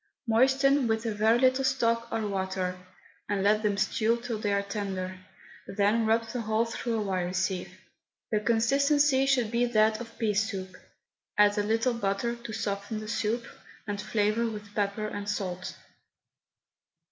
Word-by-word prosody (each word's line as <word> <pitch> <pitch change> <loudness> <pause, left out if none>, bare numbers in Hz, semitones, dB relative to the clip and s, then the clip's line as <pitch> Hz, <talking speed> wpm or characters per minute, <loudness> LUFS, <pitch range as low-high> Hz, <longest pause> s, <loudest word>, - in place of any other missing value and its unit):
Moisten 265 +3 +3
with 220 +1 0
a 225 - -1
very 220 +3 +3
little 260 +1 +3
stock 235 -3 +1
or 225 -1 -1
water, 190 -2 -2 0.5
and 200 -2 0
let 210 +1 +3
them 205 -2 0
stew 230 +2 +1
till 235 -2 -4
they 205 -1 -1
are 200 0 +1
tender, 190 -2 -4 0.5
then 210 +3 +1
rub 225 +1 +2
the 245 0 -3
whole 220 +1 +1
through 230 0 -3
a - - -1
wire 185 -2 -2
sieve. 190 -1 -1 0.6
The 215 - +2
consistency 270 +5 +3
should 250 -5 +2
be 240 +1 +2
that 220 -1 +2
of 230 -1 -10
pea 220 -3 0
soup. 195 -3 -2 0.6
Add 205 0 +5
a - - +3
little 225 +4 +1
butter 230 +1 -1
to 235 -1 -9
soften 205 0 -3
the 215 - -7
soup), 220 +2 -1 0.4
and 205 -1 -3
flavour 215 +2 +1
with 210 -2 -8
pepper 205 +1 -1
and 205 -1 -5
salt. 185 -3 -3
215 Hz, 160 wpm, -28 LUFS, 200-235 Hz, 0.6 s, Add